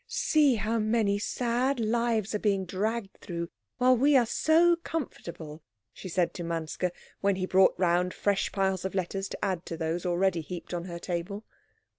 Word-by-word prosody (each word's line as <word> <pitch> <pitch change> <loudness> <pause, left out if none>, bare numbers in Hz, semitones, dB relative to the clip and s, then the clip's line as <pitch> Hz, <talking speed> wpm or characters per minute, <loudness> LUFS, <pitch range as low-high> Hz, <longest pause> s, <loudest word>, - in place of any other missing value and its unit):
"See 295 -5 +3
how 220 +2 -1
many 215 -2 +1
sad 245 +4 0
lives 225 -2 0
are 210 - 0
being 200 -3 +1
dragged 200 +3 -3
through 170 -1 -5 0.3
while 255 +1 +5
we 275 +3 +5
are 245 - +4
so 330 +8 +4
comfortable," 170 - -6 0.3
she 185 - -8
said 180 0 +1
to 175 - -5
Manske, 165 +1 -2 0.3
when 200 -1 +2
he 185 0 -2
brought 185 0 +4
round 180 0 +2
fresh 200 0 0
piles 190 -2 0
of 190 0 -4
letters 195 +1 -2
to - - -4
add 185 -3 -1
to 165 - -5
those 165 +1 -2
already 180 -1 +1
heaped 175 +3 -7
on 175 0 -3
her 170 -2 -6
table. 180 +4 -4
195 Hz, 175 wpm, -28 LUFS, 175-230 Hz, 0.3 s, while